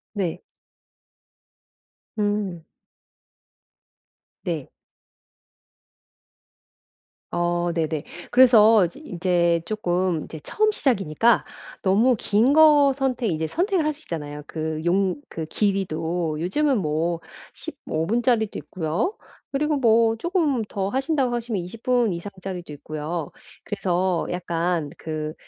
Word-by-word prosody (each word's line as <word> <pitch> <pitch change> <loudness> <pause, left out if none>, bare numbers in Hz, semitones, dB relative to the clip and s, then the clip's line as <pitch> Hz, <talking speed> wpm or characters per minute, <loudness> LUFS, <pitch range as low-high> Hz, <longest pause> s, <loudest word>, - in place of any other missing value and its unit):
네. 185 -5 -2 1.8
음. 205 -5 -1 1.8
네. 165 -7 -2 2.6
어. 175 0 0
네네. 160 -2 -1 0.3
그래서 225 -5 +7
이즈 175 - -7
인제 175 - +1
조금 180 -5 0
인제 160 0 -9
처음 430 0 +1
시작이니까 230 - +2 0.4
너무 220 +7 +4
긴 225 +7 +3
거 295 -3 +6
선택 260 -3 -1
인제 160 0 -1
선택을 360 - 0
하시잖아요 160 - -4
그 155 -1 -3
용 185 +1 +2
그 160 - -5
길이도. 170 -4 -1
요즘은 265 - +1
뭐 165 0 -1 0.3
15 275 - -4
분짜리도 230 +1 +1
있고요. 180 - -2 0.4
그리고 300 +2 +1
뭐 230 -3 +4
조금 315 - 0
더 195 -1 -2
하신다고 265 0 0
하시면 230 -5 -2
20 180 +6 -9
분 245 -4 +2
이상짜리도 180 -2 -7
있고요. 155 +2 -5 0.3
그래서 185 -3 0
약간 170 -2 -1
그 155 -1 -4
190 Hz, 205 characters per minute, -24 LUFS, 170-245 Hz, 2.6 s, 그래서